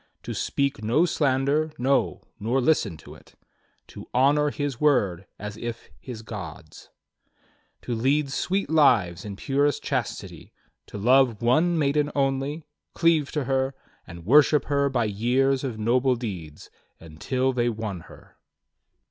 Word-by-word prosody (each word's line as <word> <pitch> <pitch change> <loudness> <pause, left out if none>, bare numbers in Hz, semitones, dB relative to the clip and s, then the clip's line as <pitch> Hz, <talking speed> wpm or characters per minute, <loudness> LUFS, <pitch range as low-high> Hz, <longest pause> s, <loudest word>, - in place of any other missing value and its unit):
To - - -5
speak 140 -5 -2
no 130 +11 +3
slander, 145 0 +1
no, 135 +3 0 0.2
nor 115 +6 0
listen 120 - +1
to 75 - -13
it. - - -19 0.5
To - - -11
honor 145 +3 +3
his 145 -3 -3
own - - -23
word 100 - +2
as 105 +1 -7
if 120 0 -7
his 115 -4 -9
God's, 90 -8 -9 0.9
To 120 - -3
lead 135 +5 +1
sweet 190 +7 -1
lives 105 - +3
in 100 -2 -6
purest 140 +5 0
chastity. - - -4 0.3
To - - -8
love 120 +1 +3
one 160 +8 +3
maiden 145 0 +1
only, 140 +3 -1 0.3
cleave 165 -4 +2
to 150 -3 -1
her, 135 +1 -1 0.3
And 85 -1 -11
worship 145 +5 +5
her 140 -1 +1
by 120 -4 0
years 125 +6 +1
of 125 -5 -4
noble 125 +4 +2
deeds. 90 -11 -7 0.3
Until 125 - -2
they 120 -1 +1
won 110 -5 -4
her." - - -16
130 Hz, 140 wpm, -25 LUFS, 110-145 Hz, 0.9 s, worship